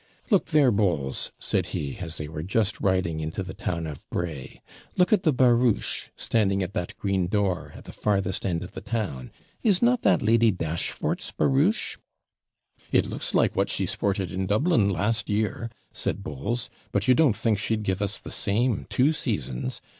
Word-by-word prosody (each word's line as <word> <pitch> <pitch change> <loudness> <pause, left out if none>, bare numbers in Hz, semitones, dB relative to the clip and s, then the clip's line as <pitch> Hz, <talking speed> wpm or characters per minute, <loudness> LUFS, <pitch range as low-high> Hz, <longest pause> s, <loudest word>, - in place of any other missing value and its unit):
'Look 200 - +4
there, 150 -6 +4
Bowles,' 85 -11 0
said - - 0
he, 70 -2 -4
as 85 -3 -4
they 75 - -4
were 75 0 -6
just 100 +4 0
riding 95 -5 +1
into 80 +4 -3
the 95 - -7
town 85 -2 -3
of 75 -3 -8
Bray; 80 -7 -4 0.4
'look 180 +3 +4
at 210 - +4
the 160 - +3
barouche, 125 -3 +2
standing 100 -3 +1
at 90 +2 -5
that 90 - -4
green 95 -3 0
door, 95 -2 0
at - - -11
the - - -11
farthest 100 -3 0
end 85 -3 -1
of 90 - -9
the - - -7
town. 95 - -3 0.3
Is 200 -5 +3
not 240 0 +3
that - - +3
Lady 115 +1 +4
Dashfort's 85 -3 -2
barouche?' 145 +10 +1 0.9
'It - - +4
looks - - -4
like - - +3
what - - +1
she - - 0
sported 95 -3 -1
in 95 +1 -2
Dublin 110 - +3
last 105 +4 0
year,' 110 +2 -1 0.2
said 100 - -2
Bowles; 100 - -3 0.2
'but - - 0
you 130 - +7
don't 130 -4 +4
think 110 -1 +1
she'd 110 +1 -1
give 95 -1 -1
us 100 0 0
the - - -9
same 110 +3 0
two 140 +5 +3
seasons? 75 - -3
100 Hz, 180 wpm, -26 LUFS, 90-115 Hz, 0.9 s, you